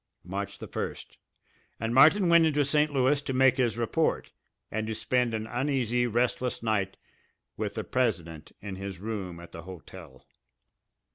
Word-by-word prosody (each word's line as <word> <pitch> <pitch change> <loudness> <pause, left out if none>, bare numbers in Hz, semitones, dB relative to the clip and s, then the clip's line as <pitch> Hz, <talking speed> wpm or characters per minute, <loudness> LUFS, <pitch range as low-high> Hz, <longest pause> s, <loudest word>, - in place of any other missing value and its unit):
March 95 +3 -5
the - - -8
first - - -6 0.6
and 115 +1 -2
Martin 160 +9 +6
went 170 -1 +6
into 150 -2 +2
St. 150 +2 +2
Louis 140 +1 +2
to 135 - -4
make 130 0 +4
his 120 -4 +1
report, 120 +7 0 0.4
and 110 0 -2
to 110 - -2
spend 120 +2 +1
an 110 0 -3
uneasy, 120 0 0
restless 120 +1 0
night 100 -4 0 0.6
with 105 -1 -3
the 110 - -2
president 85 -9 -2
in 95 -2 -6
his 95 -1 -6
room 95 -5 -5
at 85 - -12
the 85 - -8
hotel. 85 -5 -12
115 Hz, 155 wpm, -28 LUFS, 100-130 Hz, 0.6 s, Martin